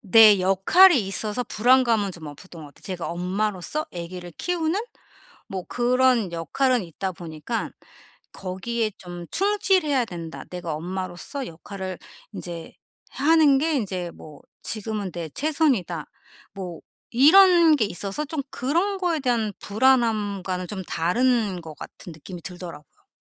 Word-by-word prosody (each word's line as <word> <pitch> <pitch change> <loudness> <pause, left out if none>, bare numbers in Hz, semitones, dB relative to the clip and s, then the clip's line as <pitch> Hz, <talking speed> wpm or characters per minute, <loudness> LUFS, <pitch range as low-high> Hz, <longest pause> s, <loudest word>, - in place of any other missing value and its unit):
내 215 -1 +7
역할이 250 - +6
있어서 210 +4 -2
불안감은 230 -4 +3
좀 160 -3 -9
없었던 160 +3 -11
것 - - -9
같아요. - - -22
제가 185 -3 -4
엄마로서 190 - -2
애기를 175 0 -7
키우는 355 +2 -1 0.7
뭐 190 -2 -5
그런 245 -5 +2
역할은 235 - +1
있다 185 +3 -4
보니까 170 +6 -5 0.6
거기에 215 +4 -3
좀 175 -1 -8
'충실해야 380 - +2
된다. 170 -4 -7
내가 175 -3 -4
엄마로서 185 - -5
역할을 185 +2 -7 0.3
인제 170 -2 -7 0.4
하는 295 0 +4
게 320 +1 +1
인제 185 -8 -2
뭐 150 -2 -13 0.2
지금은 210 -3 -3
내 165 -2 -5
최선이다.' 255 - 0 0.4
뭐 180 -4 -7 0.3
이런 335 +4 +7
게 230 -7 +2
있어서 200 - -4
좀 300 -1 -3
그런 345 +10 0
거에 345 -4 0
대한 235 -6 0
불안함과는 205 -6 +1
좀 190 -1 -5
다른 205 +2 +1
것 160 -2 -10
같은 175 - -10
느낌이 170 +3 -10
들더라고요. 175 -5 -10
205 Hz, 285 characters per minute, -24 LUFS, 175-260 Hz, 0.7 s, 내